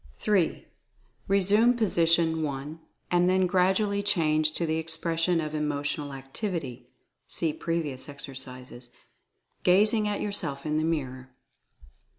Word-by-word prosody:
3. 195 Hz, -6 st, 0 dB, 0.6 s
Resume 205 Hz, +5 st, +4 dB
position 165 Hz, -6 st, +2 dB
1, 145 Hz, +1 st, -4 dB, 0.3 s
and 175 Hz, 0 st, +3 dB
then 185 Hz, 0 st, +3 dB
gradually 190 Hz, +3 st, +2 dB
change 155 Hz, -6 st, +2 dB
to 170 Hz, -, -2 dB
the 160 Hz, 0 st, 0 dB
expression 165 Hz, +1 st, 0 dB
of 155 Hz, -1 st, -4 dB
Emotional 145 Hz, -1 st, -2 dB
Activity 135 Hz, -, -5 dB, 0.4 s
(see 160 Hz, -2 st, -2 dB
previous 150 Hz, -6 st, -3 dB
exercises), 130 Hz, -3 st, -9 dB, 0.7 s
gazing 210 Hz, +4 st, +3 dB
at 205 Hz, -1 st, -2 dB
yourself 160 Hz, -10 st, -2 dB
in 155 Hz, 0 st, 0 dB
the -, -, 0 dB
mirror. 130 Hz, -5 st, -3 dB
160 Hz, 115 wpm, -27 LUFS, 145-185 Hz, 0.7 s, Resume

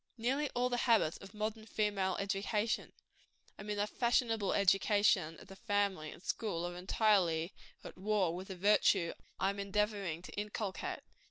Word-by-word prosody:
Nearly 270 Hz, +5 st, 0 dB
all 245 Hz, +1 st, +2 dB
the 245 Hz, -, 0 dB
habits 210 Hz, -9 st, +4 dB
of 195 Hz, +1 st, -13 dB
modern 215 Hz, +1 st, -3 dB
female 200 Hz, -4 st, 0 dB
education 205 Hz, +2 st, -1 dB, 0.7 s
I -, -, -6 dB
mean 210 Hz, 0 st, -4 dB
the 205 Hz, -, +2 dB
fashionable 225 Hz, -2 st, +1 dB
education 195 Hz, -3 st, +3 dB
of -, -, -13 dB
the 195 Hz, -, -11 dB
family 200 Hz, -6 st, 0 dB
and 170 Hz, -, -12 dB
school 185 Hz, -7 st, -2 dB
are 175 Hz, 0 st, -5 dB
entirely 180 Hz, -3 st, +2 dB, 0.3 s
at -, -, -9 dB
war 195 Hz, -4 st, +1 dB
with 185 Hz, +2 st, -6 dB
the 190 Hz, -, -6 dB
virtue 195 Hz, -2 st, +3 dB, 0.3 s
I 195 Hz, -, +2 dB
am 200 Hz, -, -7 dB
endeavoring 200 Hz, -4 st, -1 dB
to -, -, -9 dB
inculcate. 205 Hz, -1 st, -4 dB
200 Hz, 160 wpm, -34 LUFS, 190-215 Hz, 0.7 s, habits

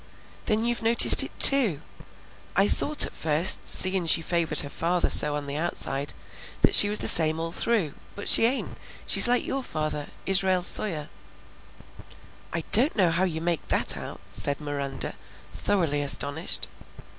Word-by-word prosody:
"Then 220 Hz, +1 st, -2 dB
you've 240 Hz, 0 st, -4 dB
noticed 230 Hz, +1 st, +5 dB
it -, -, -12 dB
too! 240 Hz, -, +4 dB, 0.8 s
I 195 Hz, +2 st, +1 dB
thought 300 Hz, +6 st, +3 dB
at -, -, -11 dB
first, 160 Hz, +3 st, +2 dB
seein' 185 Hz, -2 st, +3 dB
she 165 Hz, -, +1 dB
favored 165 Hz, -3 st, -1 dB
her 145 Hz, -, -9 dB
father 175 Hz, +2 st, -3 dB
so 150 Hz, 0 st, +2 dB
on 145 Hz, -1 st, -7 dB
the 140 Hz, +1 st, -7 dB
outside, 145 Hz, -4 st, -4 dB, 0.5 s
that -, -, +2 dB
she 205 Hz, -, +7 dB
was 210 Hz, -, +1 dB
the -, -, -2 dB
same 160 Hz, -1 st, +3 dB
all 165 Hz, 0 st, -6 dB
through; 190 Hz, -6 st, -3 dB, 0.2 s
but 205 Hz, -, -9 dB
she -, -, +6 dB
ain't, 260 Hz, +3 st, -5 dB, 0.3 s
she's -, -, +5 dB
like 245 Hz, 0 st, -1 dB
your 270 Hz, -, -5 dB
father, 155 Hz, -, -7 dB, 0.2 s
Israel 190 Hz, -1 st, 0 dB
Sawyer." 165 Hz, -5 st, +1 dB, 1.4 s
"I 165 Hz, -, -5 dB
don't 255 Hz, +8 st, +4 dB
see 205 Hz, -, -2 dB
how 170 Hz, +3 st, -2 dB
you 160 Hz, -3 st, -6 dB
make 170 Hz, -1 st, -5 dB
that -, -, 0 dB
out," -, -, -11 dB
said 140 Hz, -1 st, -2 dB
Miranda, 140 Hz, -2 st, -5 dB, 0.4 s
thoroughly 165 Hz, -8 st, -3 dB
astonished. 145 Hz, +3 st, -2 dB
170 Hz, 160 wpm, -23 LUFS, 150-205 Hz, 1.4 s, she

